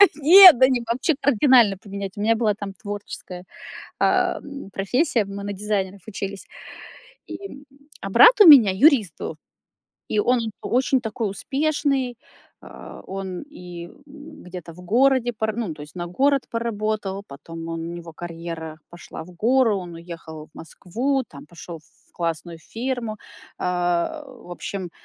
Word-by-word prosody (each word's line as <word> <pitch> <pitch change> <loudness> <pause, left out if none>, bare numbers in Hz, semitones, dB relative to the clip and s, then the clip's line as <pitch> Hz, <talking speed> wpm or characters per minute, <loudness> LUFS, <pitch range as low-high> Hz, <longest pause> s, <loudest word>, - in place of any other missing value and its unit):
Нет! 345 +2 +9
Да 260 - +7
не, 255 -2 0
вообще 260 +7 0
кардинально 250 -6 +4
поменять. 200 -1 -7
У - - -4
меня 225 +2 +3
была 220 -2 +1
там 200 -2 -7
творческая, 200 -2 -8 0.6
а, - - +2
м, 280 -6 -10
профессия, 230 - 0
мы 200 0 -7
на 205 - -4
дизайнеров 200 -1 -3
учились, 195 -2 -6 0.8
и 340 -8 -9 0.4
а 195 - -5
брат 470 - +7
у 405 - +9
меня 255 -10 +9
юрист 235 - +4
был. 155 - -6 0.7
И 215 - 0
он 245 +4 +2 0.2
очень 255 +1 +1
такой 220 -1 -3
успешный. 275 +1 -1 0.4
А, - - -12
он 190 -1 -6
и 180 - -10 0.2
где-то 185 - -11
в 180 - -14
городе 245 +4 +2
пора 220 0 -2 0.2
то 150 - -12
есть 150 +3 -12
на 175 -1 -5
город 275 +9 +1
поработал, 215 -3 -3
потом 165 +4 -9
он 165 0 -4
у - - -6
него 170 -1 -9
карьера 165 -1 -7
пошла 175 -2 -10
в 180 - -14
гору, 230 +3 +2
он 180 -2 -8
уехал 165 -2 -10
в - - -33
Москву, 245 - -3
там 140 0 -13
пошел 170 0 -10
в 155 - -31
классную 165 0 -4
фирму. 235 +1 -4 0.4
А, 180 - -1
в 245 -8 -14
общем, 185 +1 -6
205 Hz, 150 wpm, -22 LUFS, 175-260 Hz, 0.8 s, Нет